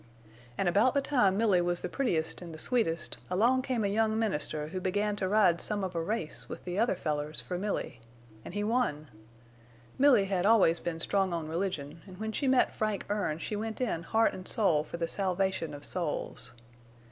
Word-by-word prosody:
"An' 195 Hz, -, 0 dB
about 215 Hz, +10 st, +3 dB
the -, -, +5 dB
time 225 Hz, -10 st, +2 dB
Milly 205 Hz, -5 st, +3 dB
was 175 Hz, 0 st, 0 dB
the -, -, -2 dB
prettiest 170 Hz, -, -1 dB
an' 175 Hz, -2 st, -8 dB
the -, -, -8 dB
sweetest, 170 Hz, -6 st, 0 dB
along 235 Hz, +8 st, +3 dB
came 255 Hz, -4 st, -1 dB
a -, -, +2 dB
young 220 Hz, +2 st, +1 dB
minister 155 Hz, -8 st, -1 dB
who 185 Hz, +2 st, -4 dB
began 205 Hz, +3 st, 0 dB
to 190 Hz, -, -1 dB
ride 190 Hz, -5 st, +4 dB
some 205 Hz, -2 st, -2 dB
of 185 Hz, -1 st, -3 dB
a 165 Hz, -, -1 dB
race 165 Hz, -3 st, -3 dB
with -, -, -7 dB
the 180 Hz, +2 st, -3 dB
other 230 Hz, -2 st, +2 dB
fellers 150 Hz, -2 st, -2 dB
for 180 Hz, -, -5 dB
Milly. 195 Hz, -, -3 dB, 0.4 s
An' -, -, -9 dB
he 205 Hz, +1 st, -1 dB
won. 210 Hz, -, 0 dB, 0.9 s
Milly 260 Hz, -8 st, +6 dB
had 190 Hz, -2 st, 0 dB
always 195 Hz, -6 st, +5 dB
been 165 Hz, -1 st, -4 dB
strong 190 Hz, +1 st, +1 dB
on 165 Hz, -2 st, -3 dB
religion, 165 Hz, -3 st, -3 dB
an' 185 Hz, -, -10 dB
when 220 Hz, +3 st, -4 dB
she 275 Hz, +5 st, -1 dB
met 260 Hz, -1 st, +3 dB
Frank 215 Hz, -2 st, -2 dB
Erne 195 Hz, -7 st, -1 dB
she 210 Hz, -, -4 dB
went 220 Hz, +1 st, -4 dB
in 225 Hz, -10 st, -1 dB
heart 225 Hz, +5 st, +2 dB
an' 185 Hz, 0 st, -8 dB
soul 170 Hz, -9 st, +4 dB
for 170 Hz, -, -7 dB
the 165 Hz, -1 st, -1 dB
salvation 190 Hz, -2 st, -1 dB
of 145 Hz, -1 st, -7 dB
souls. 155 Hz, -7 st, -3 dB
190 Hz, 200 wpm, -30 LUFS, 165-220 Hz, 0.9 s, Milly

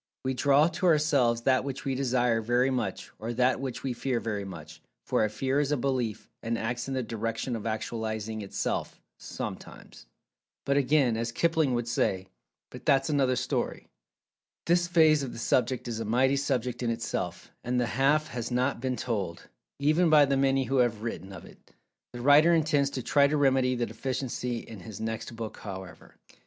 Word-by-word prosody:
We 130 Hz, -, 0 dB
draw 140 Hz, +4 st, +4 dB
to 185 Hz, +1 st, -1 dB
ourselves 145 Hz, -8 st, +3 dB
that 130 Hz, 0 st, +3 dB
which 135 Hz, -1 st, -5 dB
we 135 Hz, -, 0 dB
Desire 125 Hz, -3 st, +1 dB
very 120 Hz, +4 st, +2 dB
much, 110 Hz, -7 st, -3 dB
or 115 Hz, +2 st, -4 dB
that 125 Hz, +2 st, +2 dB
which 130 Hz, -3 st, -5 dB
we 130 Hz, -, -1 dB
Fear 125 Hz, 0 st, -1 dB
very 105 Hz, -3 st, -3 dB
much, 80 Hz, -5 st, -10 dB, 0.2 s
for -, -, +1 dB
a 110 Hz, -, +1 dB
Fear 130 Hz, +6 st, -1 dB
is 145 Hz, -1 st, 0 dB
a 150 Hz, -, +2 dB
Belief, 125 Hz, -4 st, -2 dB
and 115 Hz, 0 st, -2 dB
acts 120 Hz, +2 st, -3 dB
in 135 Hz, -, -3 dB
the 130 Hz, -, -1 dB
direction 115 Hz, +2 st, -3 dB
of 115 Hz, 0 st, -5 dB
actualizing 110 Hz, -1 st, -3 dB
itself, 100 Hz, -, -3 dB, 0.2 s
sometimes. -, -, -8 dB, 0.6 s
But, 140 Hz, -, +1 dB
again, 140 Hz, -3 st, +3 dB
as 115 Hz, +1 st, -2 dB
Kipling 160 Hz, -2 st, +1 dB
would 120 Hz, -1 st, -2 dB
say: 95 Hz, -5 st, 0 dB, 0.4 s
"But, 125 Hz, 0 st, -10 dB
that's 135 Hz, +1 st, +2 dB
another 135 Hz, -3 st, +2 dB
story." -, -, -2 dB, 0.8 s
This 175 Hz, +1 st, +3 dB
phase 160 Hz, -4 st, +5 dB
of 135 Hz, -3 st, -5 dB
the -, -, -8 dB
subject 125 Hz, +1 st, 0 dB
is 115 Hz, -2 st, -3 dB
a -, -, -2 dB
mighty 130 Hz, +5 st, +2 dB
subject 125 Hz, -3 st, -1 dB
in 120 Hz, -, 0 dB
itself, 115 Hz, 0 st, -4 dB
and 125 Hz, +1 st, 0 dB
"the 120 Hz, -, +2 dB
half 140 Hz, +6 st, +2 dB
has 120 Hz, -2 st, -4 dB
not 125 Hz, 0 st, 0 dB
been 130 Hz, -1 st, -1 dB
told" 100 Hz, -10 st, -4 dB, 0.3 s
even 155 Hz, +5 st, +3 dB
by 150 Hz, -2 st, +7 dB
the 140 Hz, 0 st, +1 dB
many 135 Hz, 0 st, +2 dB
who 135 Hz, +1 st, -1 dB
have 115 Hz, -4 st, +1 dB
written 100 Hz, -5 st, -5 dB
of 95 Hz, -4 st, -10 dB
it. -, -, -18 dB, 0.4 s
The 120 Hz, -, -6 dB
writer 150 Hz, +6 st, +6 dB
intends 150 Hz, -3 st, +2 dB
to 130 Hz, -3 st, -5 dB
try 140 Hz, +3 st, +4 dB
to 150 Hz, +1 st, 0 dB
remedy 130 Hz, -2 st, +3 dB
the 120 Hz, -1 st, 0 dB
deficiency 125 Hz, 0 st, -3 dB
in 110 Hz, -, -11 dB
his 95 Hz, +3 st, -9 dB
next 110 Hz, +1 st, -4 dB
book, 115 Hz, -1 st, -6 dB
however. 95 Hz, -2 st, -9 dB
125 Hz, 190 wpm, -28 LUFS, 115-140 Hz, 0.8 s, by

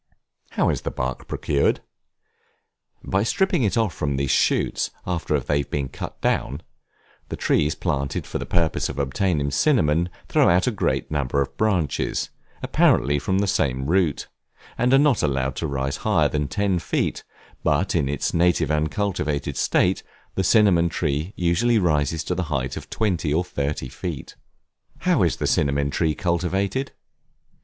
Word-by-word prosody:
How -, -, +2 dB
is -, -, -1 dB
the -, -, -3 dB
bark 65 Hz, 0 st, -4 dB
procured? 70 Hz, -, 0 dB, 1.2 s
By 95 Hz, -, 0 dB
stripping 180 Hz, -, +1 dB
it 110 Hz, -1 st, +1 dB
off 110 Hz, -7 st, +1 dB
from 70 Hz, -3 st, -2 dB
these 70 Hz, -1 st, 0 dB
shoots, -, -, +1 dB, 0.2 s
after 85 Hz, -4 st, 0 dB
they 70 Hz, +2 st, 0 dB
have 70 Hz, -, -4 dB
been 70 Hz, -3 st, -2 dB
cut -, -, -7 dB
down; 70 Hz, +5 st, 0 dB, 0.7 s
the -, -, -3 dB
trees 75 Hz, +1 st, +1 dB
planted 70 Hz, -6 st, -2 dB
for -, -, -4 dB
the -, -, -5 dB
purpose 85 Hz, -3 st, 0 dB
of -, -, -6 dB
obtaining 70 Hz, +2 st, 0 dB
cinnamon, 85 Hz, -, +2 dB, 0.2 s
throw -, -, +4 dB
out 90 Hz, +2 st, +3 dB
a 125 Hz, -, +1 dB
great 105 Hz, -, -1 dB
number 70 Hz, -2 st, 0 dB
of 70 Hz, -, -2 dB
branches, 95 Hz, -, 0 dB, 0.3 s
apparently 70 Hz, +3 st, +3 dB
from 95 Hz, +6 st, 0 dB
the 100 Hz, -, +2 dB
same 65 Hz, -8 st, 0 dB
root, 85 Hz, -1 st, +1 dB, 0.5 s
and 125 Hz, +1 st, +1 dB
are 135 Hz, -, +7 dB
not 140 Hz, -4 st, +3 dB
allowed 65 Hz, -2 st, 0 dB
to 80 Hz, -, -2 dB
rise 70 Hz, 0 st, -2 dB
higher -, -, +2 dB
than 75 Hz, -1 st, -1 dB
ten 100 Hz, -1 st, 0 dB
feet; -, -, -2 dB, 0.4 s
but 75 Hz, +7 st, +1 dB
in 75 Hz, -6 st, +1 dB
its 75 Hz, -, -1 dB
native 85 Hz, -3 st, +2 dB
uncultivated 75 Hz, -1 st, -1 dB
state, -, -, +2 dB, 0.3 s
the 95 Hz, -, -1 dB
cinnamon 95 Hz, -5 st, +4 dB
tree 75 Hz, +2 st, -2 dB
usually 100 Hz, +8 st, +2 dB
rises 80 Hz, -4 st, +1 dB
to -, -, -2 dB
the 90 Hz, +1 st, -1 dB
height 65 Hz, -3 st, -2 dB
of -, -, -8 dB
twenty 90 Hz, -8 st, -1 dB
or 80 Hz, +4 st, +2 dB
thirty 70 Hz, -6 st, -3 dB
feet. 75 Hz, +3 st, -6 dB, 0.7 s
How -, -, +2 dB
is -, -, +2 dB
the -, -, -3 dB
Cinnamon 70 Hz, 0 st, +1 dB
Tree 80 Hz, -1 st, 0 dB
cultivated? 95 Hz, -, -1 dB
80 Hz, 160 wpm, -23 LUFS, 70-95 Hz, 1.2 s, are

